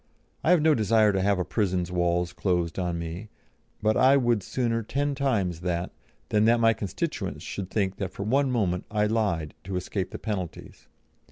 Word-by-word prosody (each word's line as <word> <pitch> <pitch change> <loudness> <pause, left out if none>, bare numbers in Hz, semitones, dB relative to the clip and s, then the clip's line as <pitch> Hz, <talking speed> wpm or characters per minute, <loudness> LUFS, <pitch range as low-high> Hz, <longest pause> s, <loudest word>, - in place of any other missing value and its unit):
I - - +1
have 175 -4 +5
no 160 -1 +5
desire 110 -2 +3
to 95 - +1
have 100 0 +2
a 90 - -1
prison's 90 -5 -1
walls 85 0 0
closed 90 -1 -1
on 90 -2 -1
me, 85 +6 -6 0.5
but 110 0 +3
I 135 +2 +5
would 120 -5 +2
sooner 115 +2 -1
ten 140 +6 -1
times 110 - 0
that, 85 0 -2 0.4
than 105 0 +3
that 115 +1 +4
my 115 0 +5
constituents 100 -5 -4
should 95 -2 -5
think 95 -2 -1
that 95 -3 -3
for 100 - -6
one 135 +6 +2
moment 95 -8 0
I 105 -1 +1
lied 100 -9 0
to 95 0 -4
escape 90 +1 -2
the - - -6
penalties. 95 -6 -6
100 Hz, 185 wpm, -26 LUFS, 90-115 Hz, 0.5 s, have